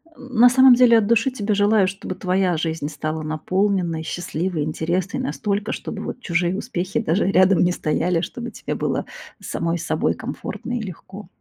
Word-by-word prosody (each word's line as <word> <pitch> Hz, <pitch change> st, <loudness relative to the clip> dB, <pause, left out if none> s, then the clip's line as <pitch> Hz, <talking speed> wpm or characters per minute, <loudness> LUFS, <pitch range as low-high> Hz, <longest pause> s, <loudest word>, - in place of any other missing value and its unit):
М, 255 Hz, -1 st, -11 dB
на 245 Hz, +1 st, +9 dB
самом 260 Hz, 0 st, +7 dB
деле, 240 Hz, -2 st, +6 dB
от 205 Hz, -2 st, +2 dB
души 235 Hz, +3 st, +2 dB
тебе 210 Hz, -4 st, -2 dB
желаю, 205 Hz, -1 st, +3 dB
чтобы 190 Hz, -1 st, -5 dB
твоя 185 Hz, -2 st, 0 dB
жизнь 160 Hz, -2 st, -2 dB
стала 155 Hz, +1 st, -4 dB
наполненной, 175 Hz, +1 st, -1 dB
счастливой, 175 Hz, -1 st, -3 dB
интересной 175 Hz, -, -2 dB
настолько, 210 Hz, -5 st, -2 dB
чтобы, -, -, -5 dB
вот, -, -, -6 dB
чужие 175 Hz, +1 st, 0 dB
успехи 185 Hz, -5 st, -3 dB
даже 175 Hz, +5 st, +1 dB
рядом 185 Hz, 0 st, +4 dB
не 180 Hz, -, +2 dB
стояли, 165 Hz, +1 st, 0 dB
чтобы 240 Hz, +6 st, -6 dB
тебе -, -, -5 dB
было -, -, -2 dB, 0.4 s
с -, -, -9 dB
самой 170 Hz, 0 st, -1 dB
с 165 Hz, -, -6 dB
собой -, -, 0 dB
комфортно 245 Hz, -, -6 dB
и -, -, -4 dB
легко. 190 Hz, 0 st, -9 dB
185 Hz, 180 wpm, -22 LUFS, 170-215 Hz, 0.4 s, на